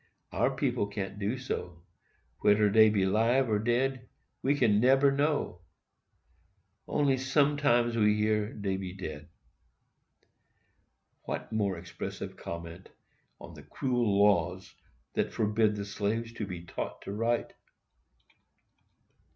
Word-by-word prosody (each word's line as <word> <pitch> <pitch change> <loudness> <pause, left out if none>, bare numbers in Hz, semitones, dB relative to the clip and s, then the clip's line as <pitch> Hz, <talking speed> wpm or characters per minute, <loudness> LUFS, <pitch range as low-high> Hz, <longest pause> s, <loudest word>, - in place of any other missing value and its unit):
Our - - +2
people 100 - 0
can't 100 -1 -5
do 105 +5 -1
so. 90 -9 -5 0.6
Wheder 105 0 +4
dey 110 +1 +7
be 100 -3 +1
'live 115 +7 +2
or 105 - +2
dead, 125 +3 0 0.3
we 140 +2 +2
can't 110 -6 +3
neber 135 +3 +5
know—only 100 - -4
sometimes 135 -3 +2
we 105 -2 +3
hears 105 0 0
dey 95 -1 0
be 95 -2 -6
dead." 75 -4 -7 2.0
What - - -5
more 100 -4 0
expressive 85 - -7
comment 85 +2 -8 0.5
on - - -11
the - - -11
cruel 120 -6 0
laws 95 -3 +2 0.4
that - - -1
forbid 110 0 +1
the 100 -1 -4
slave 110 +3 -2
to 105 - -3
be 90 -3 -7
taught - - -6
to - - -6
write! 115 +3 -1
105 Hz, 120 wpm, -29 LUFS, 95-120 Hz, 2.0 s, dey